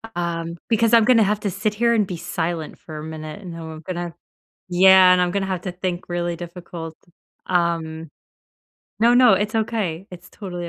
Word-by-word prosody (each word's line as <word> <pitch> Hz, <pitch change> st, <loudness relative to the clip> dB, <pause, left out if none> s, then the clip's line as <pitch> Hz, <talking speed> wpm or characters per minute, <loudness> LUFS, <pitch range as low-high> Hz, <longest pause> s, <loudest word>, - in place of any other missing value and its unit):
Um, 170 Hz, -1 st, -3 dB
because 230 Hz, 0 st, +2 dB
I'm 225 Hz, -2 st, +7 dB
gonna 235 Hz, -3 st, +5 dB
have 210 Hz, +1 st, 0 dB
to 200 Hz, -, -2 dB
sit 210 Hz, +3 st, -2 dB
here 235 Hz, +2 st, +2 dB
and 210 Hz, -4 st, +2 dB
be 180 Hz, -2 st, -5 dB
silent 170 Hz, -2 st, -4 dB
for 155 Hz, -2 st, -9 dB
a 150 Hz, -, -7 dB
minute, 155 Hz, +2 st, -7 dB
and 180 Hz, -4 st, -8 dB
then 165 Hz, -, -8 dB
I'm 160 Hz, -1 st, -8 dB
gonna 175 Hz, -2 st, -5 dB, 0.5 s
yeah, 185 Hz, 0 st, +7 dB
and 180 Hz, -, +4 dB
I'm 180 Hz, -1 st, +1 dB
gonna 200 Hz, -1 st, -1 dB
have 185 Hz, -2 st, -3 dB
to 185 Hz, -, -4 dB
think 180 Hz, 0 st, -4 dB
really 175 Hz, 0 st, -2 dB
difficult. 170 Hz, -1 st, -8 dB, 0.5 s
Um. 165 Hz, -3 st, -1 dB, 0.9 s
No, 235 Hz, +2 st, +5 dB
no, 245 Hz, -2 st, +6 dB
it's 205 Hz, +3 st, 0 dB
okay. 205 Hz, -5 st, -2 dB
It's 180 Hz, 0 st, -12 dB
totally 175 Hz, -4 st, -6 dB
180 Hz, 190 wpm, -22 LUFS, 170-200 Hz, 0.9 s, I'm